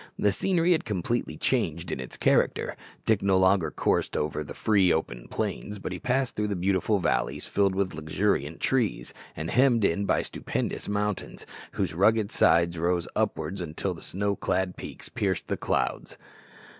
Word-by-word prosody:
The 105 - +3
scenery 175 - +2
had 165 - +3
completely 105 +3 -2
changed 85 - 0
in - - -3
its 65 - -6
character. - - +2 0.3
Dick 110 -3 +3
no 95 -1 +3
longer 95 -3 +3
coursed - - 0
over 75 0 -1
the 75 - -9
free, 100 -5 +3
open - - -2
plains, 105 0 -3
but 95 - -5
he 90 - -4
passed 130 +2 0
through 105 0 0
beautiful 95 +3 +1
valleys 95 - 0
filled 100 -2 +1
with 95 -1 0
luxuriant 80 0 -1
trees, 125 -5 0 0.2
and 80 +2 -4
hemmed 125 -4 +4
in 100 +4 +1
by - - +2
stupendous - - -3
mountains, 105 -1 -2 0.3
whose - - -1
rugged 105 +4 +3
sides 85 0 +3
rose 85 0 +1
upward 95 - -1
until 85 +3 -3
the 85 - -11
snow 100 +2 -1
clad 95 -2 -1
peaks - - -7
pierced 95 -4 -2
the - - +1
clouds. - - -2
95 Hz, 165 wpm, -27 LUFS, 85-105 Hz, 0.3 s, hemmed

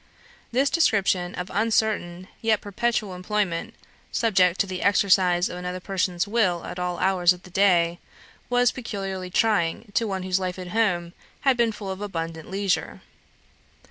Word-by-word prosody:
This 270 +3 +2
description 195 - +2
of 180 0 -5
uncertain, 205 -4 0
yet 225 -2 +2
perpetual 210 -1 -1
employment, 195 +2 -2 0.4
subject 190 -6 +2
to - - +1
the 185 -1 -5
exercise 185 -3 +3
of 180 - -6
another 180 0 -4
person's 180 -1 -1
will 195 -6 +1
at 180 - -6
all 180 -1 -2
hours 185 -1 +3
of 180 - -14
the 180 - -14
day, 175 -3 +3 0.5
was 245 0 +3
peculiarly 195 -6 -5
trying 205 0 +1
to 230 - +1
one 190 -2 -3
whose 185 0 0
life 185 -1 -3
at 180 -1 -7
home 175 -5 0 0.3
had 270 -2 +3
been 235 -1 +2
full 205 -2 -6
of 190 +1 -6
abundant 165 -5 -5
leisure. 195 0 -1
190 Hz, 155 wpm, -25 LUFS, 180-215 Hz, 0.5 s, exercise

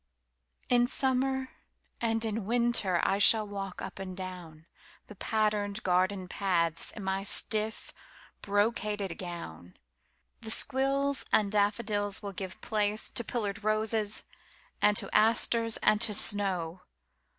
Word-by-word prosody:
In 245 -1 +3
Summer 265 0 0 0.5
and 225 -1 0
in 220 -1 -3
Winter 235 -6 +1
I 195 - +1
shall 215 +1 +6
walkUp 195 -2 -6
and 185 -1 -7
downThe 175 -4 -8 0.5
patterned 210 -1 -1
garden 185 +1 +1
pathsIn 175 +1 -1
my 190 0 -1
stiff, 215 +2 0 0.5
brocaded 205 -2 -1
gown. 90 - -8 0.6
The 220 - -6
squills 275 +3 +1
and 205 -2 +3
daffodilsWill 205 -1 0
give 190 -1 -6
place 210 0 0
to 235 - -3
pillared 220 -2 -3
roses, 215 0 0 0.6
and 210 -1 +4
to - - -1
asters, 230 +1 +2
and 215 0 +3
to 215 -3 +4
snow. 185 -5 +1
205 Hz, 110 wpm, -29 LUFS, 190-225 Hz, 0.6 s, shall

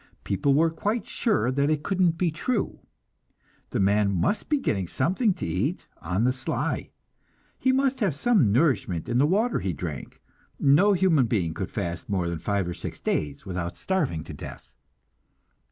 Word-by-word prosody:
People 135 +9 +1
were 165 +2 +3
quite 210 +8 -2
sure 205 - +1
that 140 +2 +1
it 155 -1 0
couldn't 180 -4 +2
be 175 -1 +1
true. 205 +8 -2 0.9
The - - -2
man 100 +1 +3
must 95 - 0
be 300 - +3
getting 95 - -1
something 190 - +1
to - - -5
eat 100 - -1 0.2
on 95 +6 -1
the 125 +1 +3
sly; 130 - -2 0.7
he 260 - +3
must 265 0 +1
have 195 - +1
some 200 - +3
nourishment 120 - +1
in 120 +1 +1
the 145 - +4
water 215 +8 +1
he 95 - -2
drank; 75 -3 -6 0.4
no 175 +9 +5
human 170 -9 +3
being 90 -8 0
could - - -4
fast 85 +1 -4
more 95 -4 0
than 85 -1 -3
five 100 +1 -1
or 90 - -3
six - - -7
days 75 -2 -2
without 90 -2 -4
starving 150 - -1
to - - -9
death. - - -10
135 Hz, 170 wpm, -26 LUFS, -, 0.9 s, no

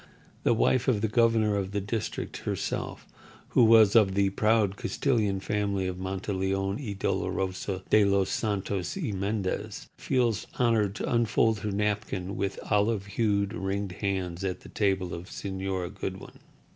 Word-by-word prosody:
The - - +3
wife 125 +3 +2
of 115 -6 +2
the 110 - +2
governor 110 -2 +3
of 100 -1 -2
the 100 - +1
district, 105 +2 -4
herself, - - -3 0.4
who - - +4
was 110 -2 +6
of 100 -4 +5
the 100 -1 +2
proud 105 -1 +2
Castilian 105 -6 0
family 100 -1 -1
of 90 0 -3
Monteleon 95 +1 -2
y 105 -5 -4
Dolorosa 95 0 -2
de 110 - +6
los 100 -1 +2
Santos 100 -4 -2
y - - -2
Mendez, 100 0 -3
feels 120 -5 0
honoured 110 -5 +2
to - - -2
unfold 115 -1 +2
her 105 +1 -3
napkin 105 -2 -2
with 100 0 -2
olive 105 -1 +2
hued, 100 -1 0
ringed 100 -2 -2
hands 95 -2 -3
at 95 -2 -2
the - - -12
table 95 -3 0
of 85 +2 -7
Señora 95 -1 -4
Goodwin. 95 -1 -7
100 Hz, 150 wpm, -28 LUFS, 95-110 Hz, 0.4 s, was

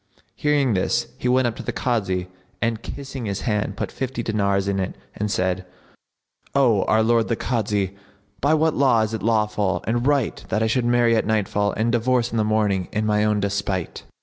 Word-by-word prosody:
Hearing 145 -5 +2
this 95 - 0
he - - -1
went 130 0 +3
up 120 -2 -1
to - - -5
the - - -3
Kazi; 95 -7 -1 0.3
and, 115 -1 -1
kissing 135 -2 -6
his 100 -1 -3
hand, 105 -2 -1
put - - -3
fifty 130 -2 -4
dinars 100 -3 0
in 100 -1 0
it 95 - -3 0.2
and 105 +1 -2
said, 95 -1 0 0.9
"O 120 -8 +4
our 110 0 +3
lord 115 0 +3
the 115 - 0
Kazi, 105 -5 -1 0.4
by 145 +3 +3
what 160 0 +2
law 130 -5 +3
is 110 0 -1
it 110 - -3
lawful 105 -4 +1
and 120 +3 0
right 140 -5 +1
that 110 - +1
I - - +2
should 120 +2 +1
marry 120 -1 +3
at 110 - 0
nightfall 105 -1 +1
and 115 +2 +1
divorce 120 0 +1
in 115 - -2
the 110 - +3
morning 105 -4 +1
in 110 0 -1
my 105 0 +2
own 105 -1 +2
despite?" 100 -3 -2
110 Hz, 200 wpm, -23 LUFS, 100-120 Hz, 0.9 s, O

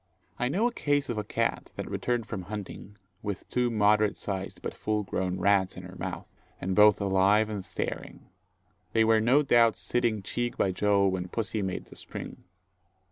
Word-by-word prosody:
I 125 - +1
know 195 - +1
a 245 - +2
case 145 -9 0
of 115 -3 -1
a - - -2
cat - - -2
that - - -5
returned 120 -2 -1
from 105 -4 -5
hunting, 105 -1 -7 0.2
with 100 -3 -5
two 125 -1 +1
moderate 105 -1 +3
sized 95 -1 -5
but - - -3
full 105 0 -1
grown 95 -1 -2
rats 95 -1 +2
in - - -7
her - - -10
mouth, - - -5 0.3
and 95 +1 -2
both 105 -1 +6
alive 100 +2 +3
and 100 -3 -4
staring. - - -5 0.7
They 110 - +4
were 110 0 +4
no 130 +7 +4
doubt 115 -4 +4
sitting 115 -4 0
cheek 120 +4 -2
by 95 - +2
jowl 100 +1 +3
when 90 -1 -3
pussy 110 +2 -2
made 95 -2 -3
the - - -14
spring. - - -7
105 Hz, 185 wpm, -28 LUFS, 100-115 Hz, 0.7 s, both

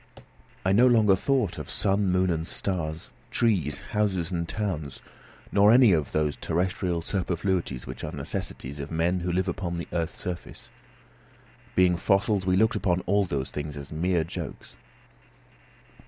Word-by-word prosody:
I 95 - +3
no 120 +5 +6
longer 110 -5 +5
thought 125 -2 0
of - - -7
sun, 100 0 +1
moon, 90 0 +2
and 80 0 -2
stars, 80 -4 -3 0.2
trees, 100 -11 +1
houses, 95 -5 0
and 85 -2 -2
towns, 90 -10 -3 0.5
nor 100 +1 +5
of 115 - +8
any 125 -4 +7
of 80 -5 +1
those 75 -2 0
terrestrial 90 0 -1
superfluities 90 -7 -1
which - - -7
are - - -4
necessaries 70 +3 -5
of 70 +1 -5
men 85 +3 +1
who 90 0 -2
live 95 +2 0
upon 85 -1 -3
the 85 - -5
earth's 85 -1 -2
surface. 90 -1 -6 1.1
Being 90 -1 +4
fossils, 100 +1 +1
we 90 0 +3
looked 110 +2 +3
upon 90 -3 +1
all 100 +2 +2
those 70 -6 -3
things 75 0 -5
as 70 -1 -8
mere 85 +2 +1
jokes. 80 -5 -7
90 Hz, 155 wpm, -27 LUFS, 80-100 Hz, 1.1 s, of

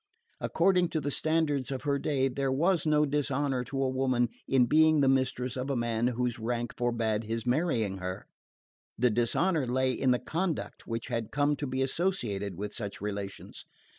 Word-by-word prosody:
According 180 0 +2
to 160 - -1
the 145 -1 -2
standards 150 -4 0
of 135 -2 -4
her 140 -1 +1
day 135 -3 +1
there 135 +1 -1
was 165 +4 +2
no 150 0 +4
dishonour 140 -2 0
to 135 +2 -2
a - - +2
woman 130 -2 +1 0.2
in 130 -2 +4
being 155 +3 +5
the 140 - +4
mistress 130 -1 +1
of 130 +1 -3
a 140 - 0
man 120 -1 0
whose 125 -1 -1
rank 120 +1 -2
forbade 115 -3 0
his 115 +1 -3
marrying 120 - 0
her: 90 0 -5 0.7
the 125 +1 +3
dishonour 130 - +1
lay 130 +1 +1
in 130 +2 0
the 125 - +4
conduct 170 +5 -3
which 115 +2 -4
had 115 -3 -2
come 145 +1 +2
to 145 - -3
be 130 +1 0
associated 120 - -1
with 105 +1 -4
such 105 -3 -5
relations. 100 -1 -6
130 Hz, 180 wpm, -29 LUFS, 115-145 Hz, 0.7 s, being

